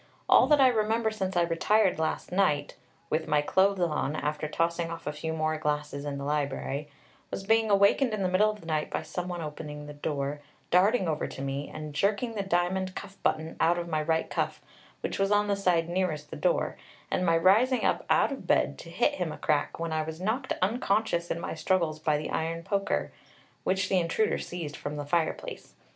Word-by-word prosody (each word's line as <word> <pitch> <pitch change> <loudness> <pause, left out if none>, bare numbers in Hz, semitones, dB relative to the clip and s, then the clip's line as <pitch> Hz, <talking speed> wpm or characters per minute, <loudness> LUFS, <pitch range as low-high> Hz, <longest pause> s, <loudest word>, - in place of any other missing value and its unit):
All - - +6
that 295 0 +5
I 265 - +7
remember 220 -1 +1
since 190 -4 -2
I 175 - +5
retired 180 +3 +2
last 160 +2 -2
night, 165 -7 +1 0.4
with 160 +1 0
my 150 -1 +2
clothes 195 +5 +3
on, 155 -3 0
after 150 0 -2
tossing 165 +2 0
off 165 0 -7
a 150 - -2
few 160 +2 -4
more 155 0 -1
glasses 150 -1 -2
in 145 -1 -3
the 140 - -5
library, 145 0 -2 0.4
was 195 - -5
being 225 +2 +3
awakened 200 +6 +4
in 215 -2 -1
the - - +2
middle 190 +4 +4
of 210 -1 -6
the - - -14
night 155 -2 -1
by - - -2
some 180 0 -4
one 175 -2 -4
opening 150 -1 -7
the 150 - -8
door, 145 0 -3 0.3
darting 190 +2 +4
over 155 -2 -1
to 135 - -7
me, 140 +1 -3
and 155 -1 -7
jerking 200 - 0
the 210 - -2
diamond 185 0 0
cuff 195 - -7
button 160 +1 0
out 170 +2 +3
of 175 0 -3
my 155 -2 0
right 160 +1 0
cuff, - - -1 0.4
which - - -3
was 195 +1 +2
on 205 0 +4
the 205 -1 +1
side 180 -4 +2
nearest 170 -4 -2
the - - -5
door, - - 0 0.3
and - - +1
my 165 -2 +4
rising 220 +9 +4
up - - +1
out - - +4
of - - -6
bed - - +2
to - - -10
hit - - +1
him - - 0
a - - -7
crack, - - 0
when 165 -1 -2
I 155 - +1
was 160 +1 -6
knocked 225 +8 -2
unconscious 200 -4 +1
in 170 - -2
my - - -4
struggles 160 -1 0
by 155 -1 +1
the 150 - -4
iron 165 +1 -2
poker, 200 +1 -1 0.5
which 190 0 +1
the 190 - +3
intruder 175 +6 +1
seized 165 -4 -5
from 145 +1 -5
the 145 -1 -4
fireplace. 160 +2 -2
170 Hz, 215 wpm, -28 LUFS, 155-195 Hz, 0.5 s, I